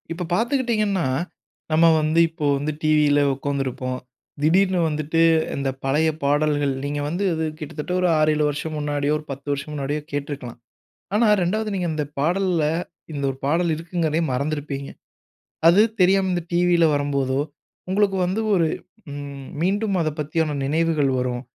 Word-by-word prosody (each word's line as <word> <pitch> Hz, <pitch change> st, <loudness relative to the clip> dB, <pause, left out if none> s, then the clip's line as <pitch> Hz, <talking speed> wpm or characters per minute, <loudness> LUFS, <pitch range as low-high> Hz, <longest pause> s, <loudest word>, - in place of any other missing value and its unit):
இப்போ 170 Hz, +2 st, -3 dB
பார்த்துக்கிட்டீங்கன்னா, 220 Hz, -, +1 dB, 0.6 s
நம்ம 160 Hz, +2 st, +5 dB, 0.2 s
வந்து 155 Hz, +2 st, +2 dB
இப்போ 160 Hz, -2 st, -5 dB
வந்து 145 Hz, +2 st, -2 dB
டிவியில 150 Hz, -1 st, +4 dB, 0.2 s
உட்கார்ந்துருப்போம். 130 Hz, -2 st, -3 dB, 0.4 s
திடீர்னு 185 Hz, +4 st, +3 dB
வந்துட்டு 155 Hz, +2 st, 0 dB, 0.3 s
இந்த 140 Hz, -1 st, -1 dB
பழைய 150 Hz, +4 st, +2 dB
பாடல்கள் 145 Hz, 0 st, +2 dB
நீங்க 145 Hz, +1 st, -2 dB
வந்து 175 Hz, +6 st, -2 dB
இது 160 Hz, 0 st, -1 dB
கிட்டத்தட்ட 155 Hz, +2 st, -6 dB
ஒரு 180 Hz, -, +3 dB
6 155 Hz, 0 st, +4 dB
7 150 Hz, -, +1 dB
வருஷம் 155 Hz, +2 st, -4 dB
முன்னாடியோ, 145 Hz, 0 st, 0 dB
ஒரு 150 Hz, -, -10 dB
10 140 Hz, +2 st, -8 dB
வருஷம் 140 Hz, +2 st, -3 dB
முன்னாடியோ 145 Hz, +1 st, -2 dB
கேட்டிருக்கலாம். 145 Hz, -4 st, -5 dB, 0.6 s
ஆனா, 225 Hz, +2 st, +4 dB, 0.2 s
2வது 215 Hz, +5 st, -1 dB
நீங்க 180 Hz, -3 st, -1 dB
இந்த 155 Hz, -1 st, -1 dB, 0.2 s
பாடல்ல, 175 Hz, +1 st, +1 dB, 0.5 s
இந்த 140 Hz, -2 st, -3 dB
ஒரு 135 Hz, -, -6 dB
பாடல் 165 Hz, +4 st, +2 dB
இருக்குங்கிறதையே 165 Hz, -1 st, -1 dB
மறந்திருப்பீங்க. 140 Hz, 0 st, -3 dB, 0.8 s
அது 175 Hz, +5 st, +7 dB, 0.2 s
தெரியாம 190 Hz, +1 st, +4 dB
இந்த 175 Hz, -1 st, -1 dB
டிவியில 175 Hz, -1 st, +4 dB
வரும்போதோ, 140 Hz, -2 st, 0 dB, 0.5 s
உங்களுக்கு 195 Hz, 0 st, +2 dB
வந்து 195 Hz, +5 st, -1 dB
ஒரு 170 Hz, -3 st, +3 dB, 0.4 s
ம் 140 Hz, -1 st, -7 dB
மீண்டும் 200 Hz, +3 st, +1 dB
அதைப்பத்தியான 155 Hz, 0 st, -1 dB
நினைவுகள் 155 Hz, -1 st, +1 dB
வரும். 125 Hz, -1 st, -2 dB
155 Hz, 140 wpm, -23 LUFS, 145-175 Hz, 0.8 s, அது